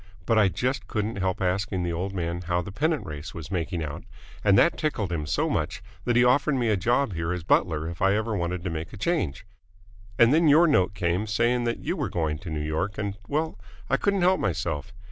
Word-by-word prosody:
But 115 0 +3
I 105 - +5
just 125 +3 -2
couldn't 105 0 -2
help 95 -1 -1
asking 95 0 0
the 85 -1 -1
old 90 +4 -2
man 85 -2 -3
how 90 0 -1
the 100 - -7
pennant 155 - 0
race 75 +2 -7
was 80 +1 -7
making 85 -2 -2
out, 75 -1 -6 0.4
and 100 -2 +5
that 170 - +5
tickled 110 - -2
him 75 -3 -2
so 75 - +1
much - - -2 0.2
that 120 - +1
he 120 - +6
offered 140 +4 +3
me 120 -3 +1
a 105 - +3
job 120 +4 +1
here 80 0 -2
as 90 -2 -3
butler 80 -1 +2
if 85 0 -7
I 95 +1 +4
ever 110 0 -1
wanted 85 -1 -2
to 90 - -2
make 80 +1 -5
a - - -8
change. 100 - -1 0.7
And 120 +3 +6
then 165 +1 +4
your 155 +4 +7
note 100 - +2
came 90 +3 0
saying 120 +3 +1
that 120 - -2
you - - -1
were - - -2
going 80 -3 -1
to 90 - -8
New 75 -1 -3
York, 85 +6 -2
and 100 -1 -2
well, 155 +2 -2 0.3
I - - +4
couldn't 200 -2 +1
help 185 +1 +4
myself. 85 -1 -2
95 Hz, 230 wpm, -26 LUFS, 85-120 Hz, 0.7 s, your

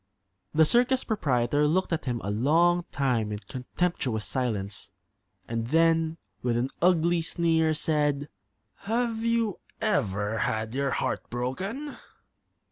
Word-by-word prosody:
The 160 0 +5
circus 250 - +3
proprietor 145 - +1
looked 180 +3 +1
at 165 - -2
him 120 -3 -2
a 100 - -2
long 170 +10 +3
time 125 -6 0
in 105 - -2
contemptuous 125 -1 -2
silence, 105 -7 -2 0.6
and 115 0 -2
then, 165 +2 +2 0.2
with 120 -1 0
an 125 +3 -1
ugly 170 -1 +3
sneer, 160 -1 +2
said: 150 -2 0 0.5
"Have 225 +1 -1
you 230 -4 +1 0.2
ever 110 - 0
had 110 +1 -1
your 140 +1 0
heart - - -2
broken?" 190 - -4
150 Hz, 125 wpm, -27 LUFS, 120-175 Hz, 0.6 s, The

